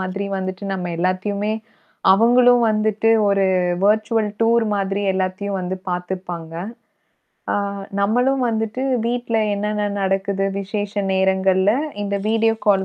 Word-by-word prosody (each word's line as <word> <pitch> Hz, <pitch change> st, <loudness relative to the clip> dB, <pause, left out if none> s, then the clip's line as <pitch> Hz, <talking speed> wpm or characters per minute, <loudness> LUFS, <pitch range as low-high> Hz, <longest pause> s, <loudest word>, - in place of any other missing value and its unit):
மாதிரி 190 Hz, +2 st, -3 dB
வந்துட்டு 185 Hz, +1 st, -5 dB
நம்ம 180 Hz, -2 st, -4 dB
எல்லாத்தயுமே 200 Hz, +4 st, -1 dB, 0.6 s
அவங்களும் 245 Hz, +3 st, +5 dB
வந்துட்டு 215 Hz, +1 st, +1 dB, 0.2 s
ஒரு 195 Hz, -1 st, +2 dB, 0.4 s
வெர்ச்சுவல் 215 Hz, +1 st, +2 dB
டூர் 230 Hz, 0 st, +3 dB
மாதிரி 195 Hz, 0 st, -1 dB
எல்லாத்தயும் 190 Hz, +1 st, -2 dB
வந்து 185 Hz, +1 st, -3 dB
பாத்துர்ப்பாங்க. 180 Hz, -2 st, -5 dB, 1.0 s
ஆ -, -, +1 dB, 0.5 s
நம்மளும் 250 Hz, +6 st, +2 dB
வந்துட்டு 220 Hz, +2 st, -2 dB, 0.3 s
வீட்ல 240 Hz, -1 st, -1 dB, 0.2 s
என்னென்ன 210 Hz, 0 st, -1 dB
நடக்குது? 195 Hz, 0 st, 0 dB
விசேஷ 205 Hz, +1 st, -4 dB, 0.2 s
நேரங்கள்ல, 190 Hz, +1 st, +2 dB, 0.3 s
இந்த 200 Hz, 0 st, -1 dB
வீடியோ 225 Hz, 0 st, +2 dB
கால் 195 Hz, -2 st, +4 dB
200 Hz, 110 wpm, -20 LUFS, 190-220 Hz, 1.0 s, அவங்களும்